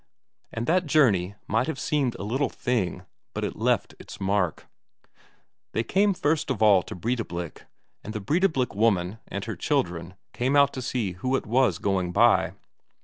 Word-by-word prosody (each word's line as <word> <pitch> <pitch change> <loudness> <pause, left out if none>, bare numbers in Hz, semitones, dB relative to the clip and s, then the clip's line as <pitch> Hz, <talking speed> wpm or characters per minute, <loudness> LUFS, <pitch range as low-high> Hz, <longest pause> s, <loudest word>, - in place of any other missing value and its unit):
And 115 +1 -3
that 180 +3 +2
journey 105 - +3
might 115 +5 +1
have 160 -4 -3
seemed 140 -5 0
a 95 - -6
little 130 +7 0
thing, 95 -7 -2 0.3
but - - -2
it - - -3
left - - 0
its - - -11
mark. 95 -3 0 1.1
They 110 - 0
came 195 - +2
first 150 -2 0
of 130 - -1
all 105 -4 +6
to - - -8
Breidablik, 90 -5 -4 0.4
and 105 - -6
the 110 - -4
Breidablik 145 - +1
woman 100 -2 +1
and - - -5
her - - -4
children 85 +2 -1 0.2
came 130 +3 0
out 140 -1 +5
to 130 - -4
see 120 -5 -2
who 125 +9 -1
it - - -2
was 120 -5 +2
going 95 -3 0
by. - - +4
115 Hz, 170 wpm, -26 LUFS, 95-135 Hz, 1.1 s, all